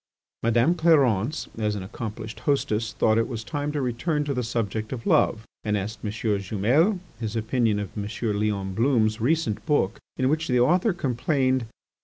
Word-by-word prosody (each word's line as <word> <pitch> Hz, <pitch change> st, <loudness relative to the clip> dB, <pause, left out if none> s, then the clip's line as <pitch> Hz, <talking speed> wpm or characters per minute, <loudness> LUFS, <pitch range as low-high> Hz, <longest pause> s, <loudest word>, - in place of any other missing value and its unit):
Madame 120 Hz, +7 st, +3 dB
Clarence 150 Hz, -, +2 dB
as 105 Hz, -1 st, 0 dB
an 100 Hz, -, -4 dB
accomplished 110 Hz, +2 st, -6 dB
hostess 110 Hz, -6 st, +1 dB
thought 110 Hz, +2 st, +2 dB
it 115 Hz, -, +1 dB
was 115 Hz, -3 st, -5 dB
time 145 Hz, +3 st, -3 dB
to 150 Hz, -, -2 dB
return 145 Hz, +5 st, -1 dB
to 145 Hz, -1 st, -2 dB
the 125 Hz, -, -1 dB
subject 110 Hz, -2 st, -2 dB
of 125 Hz, -3 st, -5 dB
love 110 Hz, 0 st, +2 dB, 0.2 s
and 105 Hz, -1 st, 0 dB
asked 105 Hz, +2 st, -4 dB
M. 105 Hz, -, -1 dB
Jumel 110 Hz, -, +1 dB, 0.2 s
his 110 Hz, -1 st, -4 dB
opinion 115 Hz, -1 st, +1 dB
of 105 Hz, -2 st, -5 dB
M. 105 Hz, -1 st, -3 dB, 0.3 s
Leon 100 Hz, -3 st, -1 dB
Blum's 110 Hz, -1 st, +2 dB
recent 130 Hz, -4 st, +1 dB
book 145 Hz, -, +1 dB, 0.2 s
in 130 Hz, -, +2 dB
which 160 Hz, +3 st, 0 dB
the 125 Hz, -1 st, +2 dB
author 175 Hz, -, +3 dB
complained. 130 Hz, -4 st, 0 dB
115 Hz, 170 wpm, -25 LUFS, 110-140 Hz, 0.3 s, Madame